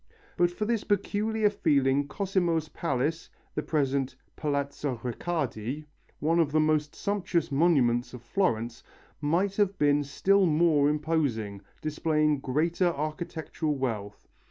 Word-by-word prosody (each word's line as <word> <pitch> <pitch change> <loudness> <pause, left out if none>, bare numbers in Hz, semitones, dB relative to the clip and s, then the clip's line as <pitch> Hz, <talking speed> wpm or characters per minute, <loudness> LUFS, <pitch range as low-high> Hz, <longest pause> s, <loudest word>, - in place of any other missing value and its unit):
But 175 0 +3
for 175 +5 -3
this 230 -1 0
peculiar 210 +1 +1
feeling 140 -6 +2
Cosimo's 175 -4 0
palace, 155 +1 -2 0.2
the - - -1
present 135 -3 0 0.2
Palazzo 140 -3 -2
Riccardi, 135 0 -3 0.3
one 165 +3 +2
of 155 -3 +2
the 155 - +3
most 155 -1 +1
sumptuous 190 -6 -1
monuments 135 -6 +3
of 120 - -11
Florence, 115 - -1 0.4
might 180 +7 +1
have 200 -2 +2
been 145 0 +3
still 195 +7 +3
more 155 -2 +4
imposing, 145 -10 -1 0.2
displaying 155 -1 +1
greater 160 +7 +1
architectural 155 0 -3
wealth. 110 -7 -4
155 Hz, 120 wpm, -28 LUFS, 140-175 Hz, 0.4 s, more